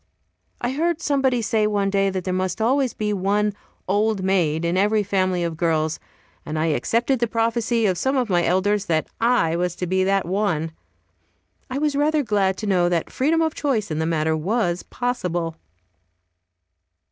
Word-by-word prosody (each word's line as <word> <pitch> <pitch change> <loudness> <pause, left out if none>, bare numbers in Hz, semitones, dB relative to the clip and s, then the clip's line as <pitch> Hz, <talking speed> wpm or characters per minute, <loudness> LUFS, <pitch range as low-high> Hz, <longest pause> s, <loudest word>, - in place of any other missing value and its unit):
I 240 - -1
heard 330 +4 0
somebody 270 -6 +1
say 220 -1 +1
one 200 -2 0
day 195 0 +2
that 185 -1 -3
there 185 - -2
must 185 0 -2
always 255 +3 +2
be 210 -1 -1
one 205 +2 +1 0.3
"old 205 +1 +1
maid" 170 -4 +1
in 170 +1 0
every 210 +2 +2
family 185 -2 0
of 165 -1 -2
girls, 160 -1 0 0.4
and 155 - -4
I 155 - +1
accepted 235 - 0
the 235 - +1
prophecy 230 0 0
of 185 -4 +1
some 265 +6 +1
of 250 -2 +1
my 175 -3 +2
elders, 200 +3 +1
that 160 -2 +1
I 230 -9 +2
was 175 0 -1
to 180 - -3
be 185 +1 +1
that 195 0 +1
one. 175 -4 -1 1.0
I 260 - -3
was 295 0 0
rather 300 +1 +2
glad 200 -4 +1
to 215 - -5
know 180 -3 +2
that 170 -2 -1
freedom 320 +5 +1
of 320 -1 0
choice 225 - -1
in 155 - -2
the 160 - 0
matter 160 -1 +1
was 180 +1 0
possible. 175 -10 -3
200 Hz, 180 wpm, -22 LUFS, 175-235 Hz, 1.0 s, day